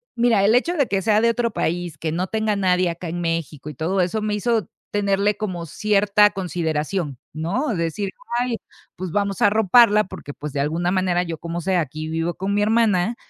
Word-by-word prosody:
mira, 235 -4 +3
el 215 +4 +4
hecho 335 +8 +2
de 280 -4 +2
que 195 -1 -1
sea 215 +1 +3
de 230 - +4
otro 235 0 0
país, 175 -1 -2
que 160 - -2
no 175 +3 -1
tenga 215 +1 -1
nadie 185 -2 +2
acá 170 +1 -6
en 175 +2 -4
México 165 -3 -3
y 150 - -9
todo 180 +7 0
eso, 180 +5 0
me 210 -1 -1
hizo 220 -2 0 0.2
tenerle 200 0 +1
como 185 -6 -4
cierta 205 +2 +3
consideración, 165 -5 -2
¿no?, 175 - -2
de 170 - -1
decir: 190 +5 -2 0.3
"Ay, 245 -1 0 0.4
pues, 185 -1 -5
vamos 200 0 -1
a - - +7
arroparla", 215 +1 +5
porque, 145 -5 -9
pues, 150 -1 -7
de 140 - -2
alguna 165 +5 0
manera 185 -2 +1
yo 170 -2 -4
como 170 +2 -5
sea 185 +1 +1
aquí 155 +1 -5
vivo 165 +2 -1
con 195 +3 -3
mi 205 - +2
hermana, 220 -2 +2
190 Hz, 210 wpm, -22 LUFS, 165-210 Hz, 0.4 s, a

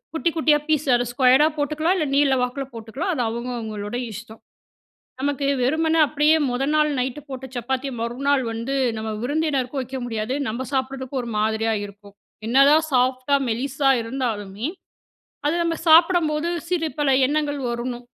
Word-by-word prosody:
குட்டி 335 - +1
குட்டியா 300 -1 +4
பீஸ் 305 -2 +1
அத 245 0 0
ஸ்கொயரா 260 +4 +5
போட்டுக்கலாம். 310 +5 0
இல்ல 310 -4 0
நீள 275 -2 +3
வாக்குல 255 +2 -2
போட்டுக்கலாம் 235 - -4
அது 250 - 0
அவங்க 235 +2 -4
அவங்களோட 215 0 -5 0.2
இஷ்டம். 220 +2 -10 0.8
நமக்கு 280 0 -1 0.2
வெறுமனே 320 +5 +2
அப்டியே 300 +2 +3
முதல் 270 +4 -1
நாள் 305 0 +3
நைட்டு 260 +3 -3
போட்ட 265 0 -6
சப்பாத்திய 265 +3 -2
மறுநாள் 265 +4 0
வந்து 230 +5 -3 0.2
நம்ம 220 0 -4
விருந்தினருக்கும் 280 -1 -1
வைக்க 260 +1 -6
முடியாது. 225 +1 -3
நம்ம 240 +4 -4
சாப்பிடுறதுக்கு 260 0 -2
ஒரு 235 - -6
மாதிரியா 220 +1 +1
இருக்கும். 200 0 -13 0.3
என்னதான் 280 +6 +5
சாஃப்ட்டா, 255 +2 +2
மெலிசா 270 +4 0
இருந்தாலுமே 225 -3 -3 0.8
அது 300 - +2
நம்ப 335 -1 -1
சாப்பிடும்போது 325 -1 +4 0.2
சிறு 335 -3 0
பல 290 -2 +2 0.2
எண்ணங்கள் 290 0 -1
வரணும். 240 +1 -4
265 Hz, 145 wpm, -22 LUFS, 235-295 Hz, 0.8 s, ஸ்கொயரா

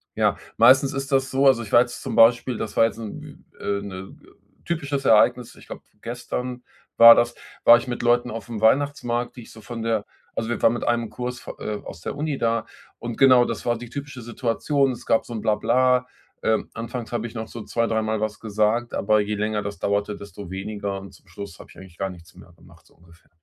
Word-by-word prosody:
ja. - - +2 0.2
Meistens 130 +4 +6
ist 135 +1 -4
das 135 -1 +2
so, 135 +1 +1
also 130 -3 +5
ich 110 - -8
war 120 - +7
jetzt 120 0 -4
zum - - -4
Beispiel, 120 +1 +4
das 110 -2 -5
war - - +5
jetzt 115 - -3
'n 110 -2 -7 0.4
w - - -11
äh, 100 0 -1
'ne 95 -1 -8 0.5
typisches 145 -5 -2
Ereignis, 115 +2 +3
ich - - -17
glaube, - - -9 0.2
gestern 125 +1 -5 0.4
war 115 0 +11
das, 120 0 +1 0.3
war 120 - +9
ich 120 - -6
mit 120 - -4
Leuten 120 +1 +2
auf 115 +1 -7
einem 115 -3 -4
Weihnachtsmarkt, 120 0 +1
die 120 - -8
ich - - -15
so 110 - -13
von 115 0 -7
der 110 -2 0 0.3
also 110 - -2
wir 120 - -2
waren 115 - +5
mit 120 - -4
einem 120 -2 0
Kurs 125 +2 -5
vo - - -6
äh, 105 -1 -4
aus 80 - -10
der - - -5
Uni 145 -1 -2
da, 115 -1 0 0.3
und 120 -1 -6
genau 130 -2 +6
das - - -5
war 120 -1 +1
die 120 0 -9
typische 140 -1 -7
Situation. 130 +4 0
Es 120 - -9
gab 115 - +2
so 120 - -8
'n 110 - -4
Blahblah. 125 +4 +2 0.4
Ähm. 110 -1 0
Anfangs 115 +1 -6
habe 120 -1 -2
ich 115 - -7
noch 110 -1 -5
so 115 - -8
2, 115 +2 -1
dreimal 110 -1 -1
was 110 -1 -3
gesagt, 110 +2 0
aber 105 +1 +2
je 105 +1 -3
länger 105 0 -1
das 100 0 -6
dauerte, 100 +1 -1
desto 100 -1 -10
weniger. 100 +1 -4
Und 95 -2 -11
zum 95 - -21
Schluss 90 0 -9
habe - - -13
ich - - -17
eigentlich 95 -3 -14
gar 95 - -2
nichts 85 -2 -15
mehr 85 - -16
gemacht, 85 0 -20
so - - -25
ungefähr. 85 0 -22
115 Hz, 230 wpm, -23 LUFS, 105-125 Hz, 0.5 s, war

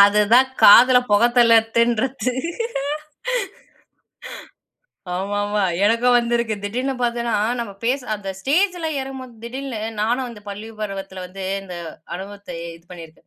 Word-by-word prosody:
அதுதான் 210 +5 +5
காதுல 250 +4 +9
புகைத் 235 +4 +4
தள்ளறத்துன்றது. 235 +2 +3 2.8
ஆமாமா, 205 +2 -1 0.2
எனக்கும் 235 +3 +4
வந்திருக்கு. 235 -2 0
திடீர்னு 250 +6 -2
பார்த்தன்னா, 235 -1 0 0.3
நம்ம 230 -4 -5
பேசு 255 +2 0
அந்த 200 -2 -7
ஸ்டேஜல்ல 345 - +1
ஏறும்போது 265 -2 -7
திடீர்னு, 255 -1 -5 0.2
நானும் 240 +4 0
அந்த 230 -3 -11
பள்ளி 205 +2 -7
பருவத்தில 195 -2 -5
வந்து 190 +1 -8 0.2
இந்த 180 -2 -8 0.4
அனுபவத்தை 200 +2 -8 0.2
இது 165 - -23
பண்ணியிருக்கேன். 165 -2 -12
230 Hz, 110 wpm, -21 LUFS, 205-250 Hz, 2.8 s, காதுல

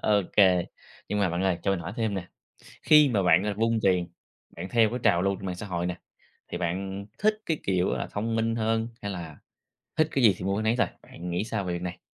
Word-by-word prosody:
Ô 105 -2 +3
kê. 90 -4 +5 0.4
Nhưng 105 - -1
mà 95 - +3
bạn 85 +2 -1
ơi, 95 -2 +1
cho 100 - +1
mình 95 -3 0
hỏi 85 +4 -6
thêm 110 -3 -1
nè, 90 -2 -5 0.6
khi 150 -3 +7
mà 100 -5 +1
bạn, 90 0 +5
gọi 105 - -1
là, 100 - -5
vung 115 0 +2
tiền, 90 -2 +2 0.5
bạn 90 +3 -6
theo 115 -3 +4
cái 125 +2 -3
trào 100 -5 +4
lưu 100 0 +1
trên 95 - -9
mạng 90 -1 -3
xã 105 - -7
hội 90 -2 -2
nè, 90 0 -2 0.5
thì - - -5
bạn 95 +3 -3
thích 215 +1 +2
cái 160 -2 0
kiểu 95 -1 +1
là - - -3
thông 115 +2 -2
minh 115 0 0
hơn 115 0 0
hay 100 - -3
là 85 -5 -7 0.6
thích 155 0 +3
cái 135 -3 +1
gì 100 -4 +7
thì 90 - -6
mua 100 +1 0
cái 110 - -1
nấy 110 +2 +2
thôi, 125 - +3 0.2
bạn 90 +1 -8
nghĩ 90 +5 -1
sao 110 -3 -3
về 90 - -2
việc 85 0 -4
này? 90 0 -5
100 Hz, 260 wpm, -27 LUFS, 90-110 Hz, 0.6 s, khi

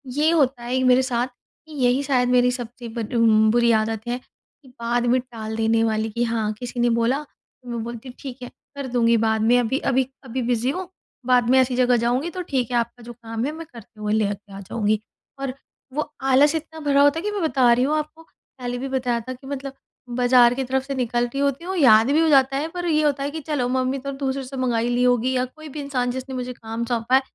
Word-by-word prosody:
ये 300 +2 +3
होता 270 -6 +2
है 245 +2 -1
कि 260 - +1
मेरे 255 0 +5
साथ 245 -1 0
कि 305 +4 -21
यही 250 +3 +3
शायद 255 -3 +1
मेरी 250 0 +4
सबसे 245 -1 -7
बर 230 +1 -2 0.3
बुरी 235 0 +3
आदत 220 +1 -4
है, 245 +1 -1 0.5
कि 265 - -18
बाद 235 +1 0
में 250 +2 +3
टाल 225 -3 -7
देने 225 0 +2
वाली, 220 0 0
कि 235 +3 -1
हाँ, 225 -2 -1
किसी 245 0 -6
ने 240 0 +3
बोला 235 +5 +1 0.4
तो 245 - -11
मैं 235 -2 -3
बोलती 235 +2 -7
हूँ, 250 - -11
"ठीक 260 -2 -8
है, 250 - -6 0.3
कर 280 -2 -5
दूँगी 235 -1 +3
बाद 220 -1 +1
में। 235 +3 +4
अभी 245 +2 0
अभी, 265 -1 +1 0.2
अभी 260 0 -4
बिज़ी 245 +1 0
हूँ। 365 +3 -5 0.4
बाद 245 -1 +3
में 260 - +5
ऐसी 255 -1 +2
जगह 245 -1 +3
जाऊँगी 250 +7 0
तो 365 +2 -5
ठीक 265 -9 -2
है, 240 - +2
आपका 235 +1 -3
जो 240 +1 -9
काम 230 0 -5
है, 290 - -1
मैं 325 +1 -8
करते 225 -2 -14
हुए 210 0 -1
ले 220 -1 +2
के 200 0 -14
आ 195 - -8
जाऊँगी।" 210 +2 0 0.4
और 270 -1 -3 0.4
वो 305 +1 -2 0.2
आलस 290 +4 +5
इतना 320 0 -5
भरा 285 -2 +3
होता 285 +3 +4
है - - -7
कि 420 - -1
मैं 410 - -3
बता 265 -7 +3
रही 245 +1 +2
हूँ 300 +3 +1
आपको, 305 +1 -5
पहले 245 -6 -8
भी 270 +2 -4
बताया 250 -3 0
था 255 - -3
कि 260 +2 -13
मतलब 275 -1 -5 0.4
बाज़ार 245 -1 +5
के 270 - -1
तरफ़ 265 +1 0
से 275 0 -4
निकलती 245 +1 -1
होती 280 +3 0
हूँ, 380 +1 -3
याद 230 -4 +6
भी 305 - +3
हो 325 - +3
जाता 270 -1 +4
है। 300 +3 -1
पर 355 0 -3
ये 310 -1 +2
होता 285 -2 +1
है 285 - -2
कि, 320 - -5
"चलो, 285 -5 -1
मम्मी 260 +1 0
तो 275 - -1
दूसरे 270 0 -1
से 265 +1 -8
मँगा 250 -3 0
हीं 230 +1 0
ली 245 0 +1
होगी", 250 +1 +2
या 250 0 +1
कोई 310 +4 -12
भी 295 - -7
इंसान 255 -3 -1
जिसने 260 +1 -6
मुझे 250 0 -4
काम 225 0 -5
सौंपा 235 +1 +1
है, 265 - +5
250 Hz, 250 wpm, -23 LUFS, 235-275 Hz, 0.5 s, याद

